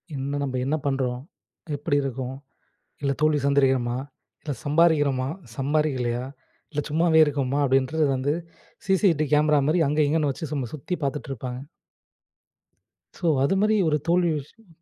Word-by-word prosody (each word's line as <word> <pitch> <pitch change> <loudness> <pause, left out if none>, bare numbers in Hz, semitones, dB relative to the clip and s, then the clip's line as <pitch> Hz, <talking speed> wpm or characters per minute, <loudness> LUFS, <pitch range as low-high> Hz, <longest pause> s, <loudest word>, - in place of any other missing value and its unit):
என்ன 140 +2 -3
நம்ப 130 -2 -3
என்ன 150 +3 +1
பண்றோம்? 130 -3 -1 0.6
எப்டி 145 0 0
இருக்கோம்? 130 0 -4 0.7
இல்ல 140 -1 +1
தோல்வி 155 -1 +3
சந்திக்கிறோமா? 130 -3 +2 0.4
இல்ல 150 - -4
சம்பாரிக்கிறமா? 145 -4 +3 0.3
சம்பாரிக்கலையா? 135 -4 0 0.5
இல்ல 150 0 -1
சும்மாவே 160 +1 +3
இருக்கோமா? 140 -1 -1
அப்டின்றது 135 +4 +2
வந்து 140 +3 0 0.5
சி-சி-டி 190 -6 +3
கேமரா 150 0 +4
மாரி 165 +2 +2
அங்க 150 +2 0
இங்கேன்னு 150 -2 +1
வச்சு 145 +2 -6
சும்மா 135 -5 -2
சுத்தி 155 +5 -5
பாத்துட்ருப்பாங்க. 130 -3 -4 1.6
ஸோ 175 - -2 0.2
அதுமாரி 205 +8 +2
ஒரு 150 -1 +2
தோல்வி 175 -1 +3
விஷயம் 210 +10 -16
145 Hz, 125 wpm, -25 LUFS, 135-155 Hz, 1.6 s, கேமரா